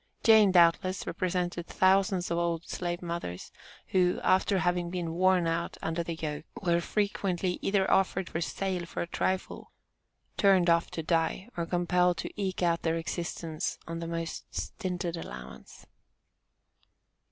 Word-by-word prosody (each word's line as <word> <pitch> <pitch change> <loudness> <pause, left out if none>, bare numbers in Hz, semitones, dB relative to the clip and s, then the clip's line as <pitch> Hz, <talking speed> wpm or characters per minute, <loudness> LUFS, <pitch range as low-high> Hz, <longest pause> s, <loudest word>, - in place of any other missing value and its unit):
Jane, 220 -3 +7
doubtless, 180 +1 +3
represented 175 -1 -2
thousands 190 -1 +2
of 170 - +1
old 170 -1 -1
slave 175 0 -3
mothers, 170 - -5 0.4
who, 180 -1 +2
after 190 +1 +3
having 175 -1 0
been 175 -2 -3
worn 185 0 +3
out 165 +1 -2
under 165 +1 -1
the 170 0 -4
yoke, 155 -1 -4
were 170 -4 +1
frequently 190 -2 -1
either 195 -1 +1
offered 190 -1 +2
for 160 - -3
sale 180 0 -2
for - - -3
a - - -7
trifle, 185 +2 -2 0.7
turned 190 -4 +5
off 170 0 +2
to 165 - -5
die, 165 +5 0
or 170 -1 -2
compelled 180 0 +2
to - - -4
eke 190 -3 -2
out 170 -1 +2
their 165 0 0
existence 165 -1 -3
on 165 0 -4
the 165 - -4
most 165 0 -4
stinted 180 -2 -3
allowance. 65 - -9
175 Hz, 145 wpm, -29 LUFS, 165-185 Hz, 0.7 s, Jane